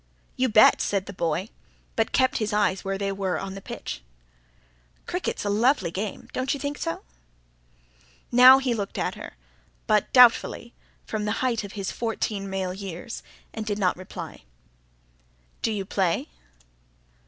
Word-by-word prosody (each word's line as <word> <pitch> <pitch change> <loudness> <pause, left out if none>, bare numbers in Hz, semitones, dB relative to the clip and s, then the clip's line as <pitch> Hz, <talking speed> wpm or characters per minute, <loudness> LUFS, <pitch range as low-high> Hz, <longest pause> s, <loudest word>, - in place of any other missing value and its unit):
"You 255 0 +1
bet!" 215 0 +6
said 195 -2 0
the 200 - -8
boy; 170 +3 -1 0.5
but 225 - +1
kept 260 +1 +2
his 215 -1 -1
eyes 205 -2 +1
where 195 0 -2
they 195 0 -1
were 190 -3 -1
on 195 0 -5
the 195 - -8
pitch. 65 - -6 1.0
"Cricket's 360 - -3
a - - 0
lovely 230 - +2
game... 200 +3 -5
don't 260 +2 -1
you - - -7
think 285 +1 -4
so?" 165 - -3 1.3
Now 255 +2 +9
he 265 -2 0
looked 205 -3 -4
at - - -1
her; - - -9 0.5
but 210 -1 +2
doubtfully, 240 -1 +5 0.3
from 215 -1 -3
the 210 - 0
height 235 -4 0
of 200 - -8
his 195 -3 -3
fourteen 215 -3 -3
male 190 -1 -2
years; 195 +2 -7 0.3
and 220 - -4
did 210 -1 -2
not 185 -3 +2
reply. 185 0 -9 1.2
"Do 225 - 0
you 200 -3 -3
play?" 185 - 0
205 Hz, 155 wpm, -25 LUFS, 195-235 Hz, 1.3 s, Now